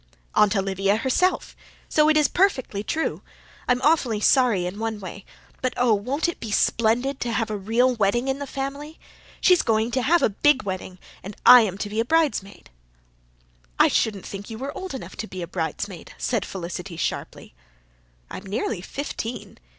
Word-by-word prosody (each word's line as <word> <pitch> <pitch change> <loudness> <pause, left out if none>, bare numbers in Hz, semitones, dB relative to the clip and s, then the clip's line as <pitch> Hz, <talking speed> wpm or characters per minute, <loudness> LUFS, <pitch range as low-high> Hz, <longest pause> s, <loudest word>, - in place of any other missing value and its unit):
"Aunt 210 0 +4
Olivia 195 0 +1
herself. 265 +11 0 0.3
So 305 0 +3
it 310 - +4
is 300 - +4
perfectly 260 - 0
true. 315 +10 -2 0.5
I'm 250 0 +2
awfully 270 -8 +2
sorry 230 -5 +3
in 180 +4 -5
one 225 -1 -3
way 195 0 -9 0.4
but 255 - -1
oh, 245 -2 +3
won't 255 +11 -1
it 340 - -4
be 225 - -6
splendid 235 +5 +1
to 240 - -2
have 225 -1 -1
a - - -2
real 230 +6 +2
wedding 240 +3 +1
in 270 +1 -1
the 285 - -5
family? 280 +4 -6 0.4
She's 365 -2 +5
going 225 0 +1
to 255 +2 0
have 335 +7 +3
a - - +4
big 260 +6 +2
wedding 185 -2 -5 0.2
and 195 +2 -8
I 250 - +10
am 195 -4 -1
to 205 - -3
be 215 +2 -1
bridesmaid." 240 -7 -1 1.1
"I - - +5
shouldn't 205 -4 0
think 200 +2 -8
you 225 - -6
were 270 +4 -6
old 375 -6 -6
enough 265 - -8
to 220 - -5
be 185 -3 -6
a - - -6
bridesmaid," 175 +1 -5
said 230 -6 -1
Felicity 180 -1 -6
sharply. 160 - -4 0.7
"I'm 190 - -9
nearly 200 -1 -2
fifteen. 245 +1 -6
225 Hz, 175 wpm, -24 LUFS, 200-270 Hz, 1.1 s, I